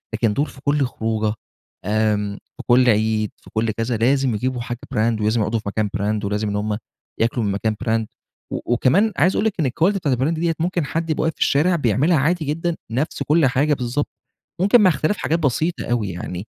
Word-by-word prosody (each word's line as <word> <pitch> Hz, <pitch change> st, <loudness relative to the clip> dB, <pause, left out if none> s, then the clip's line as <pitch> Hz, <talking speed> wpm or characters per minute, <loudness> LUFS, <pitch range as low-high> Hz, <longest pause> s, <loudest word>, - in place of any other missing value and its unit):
لكن 110 Hz, -1 st, +1 dB
دول 140 Hz, +7 st, +1 dB
في 135 Hz, -, -13 dB
كل 145 Hz, -1 st, +2 dB
خروجة، 110 Hz, -3 st, -1 dB, 0.5 s
آمم 105 Hz, -1 st, 0 dB, 0.2 s
في 125 Hz, -, -8 dB
كل 125 Hz, 0 st, +5 dB
عيد، 110 Hz, -1 st, +1 dB
في -, -, -18 dB
كل 110 Hz, 0 st, +1 dB
كذا 115 Hz, +2 st, -2 dB
لازم 130 Hz, +1 st, +2 dB
يجيبوا 125 Hz, +3 st, -2 dB
حاجة 120 Hz, 0 st, -5 dB, 0.2 s
brand، 110 Hz, 0 st, +1 dB
ولازم 110 Hz, +2 st, +1 dB
يقعدوا 110 Hz, +2 st, 0 dB
في 105 Hz, -, -5 dB
مكان 105 Hz, 0 st, -1 dB
brand، 105 Hz, +1 st, -1 dB
ولازم 105 Hz, +1 st, -1 dB
إن 100 Hz, -, -2 dB
هم 105 Hz, 0 st, -1 dB, 0.4 s
ياكلوا 115 Hz, 0 st, +1 dB
من 100 Hz, -, 0 dB
مكان 110 Hz, +2 st, -1 dB
brand، 115 Hz, -1 st, +1 dB, 0.5 s
و -, -, -2 dB
وكمان 180 Hz, -, +3 dB
عايز 175 Hz, +7 st, +3 dB
أقول 210 Hz, -, +1 dB
لِك 220 Hz, -, +2 dB
إن 150 Hz, -, +2 dB
الquality 170 Hz, +10 st, +1 dB
بتاعة 145 Hz, -9 st, +1 dB
الBrand 130 Hz, +5 st, 0 dB
ديّة، 165 Hz, 0 st, 0 dB
ممكن 175 Hz, -1 st, 0 dB
حد 165 Hz, +4 st, -3 dB
يبقى 155 Hz, -, 0 dB
واقف 160 Hz, 0 st, 0 dB
في -, -, -18 dB
الشارع 165 Hz, +6 st, +3 dB
بيعملها 145 Hz, -, +2 dB
عادي 160 Hz, +4 st, +1 dB
جدًا، 165 Hz, +4 st, -1 dB, 0.2 s
نفس 135 Hz, +7 st, -1 dB
كل 160 Hz, 0 st, +3 dB
حاجة 140 Hz, +4 st, +2 dB
بالضبط، 125 Hz, +3 st, -2 dB, 0.5 s
ممكن 205 Hz, +4 st, +5 dB
مع 190 Hz, -, +6 dB
اختلاف 160 Hz, +5 st, 0 dB
حاجات 165 Hz, +2 st, 0 dB
بسيطة 155 Hz, +3 st, 0 dB
أوي 115 Hz, -5 st, -1 dB
يعني. 90 Hz, +2 st, -6 dB
125 Hz, 210 wpm, -21 LUFS, 110-155 Hz, 0.5 s, مع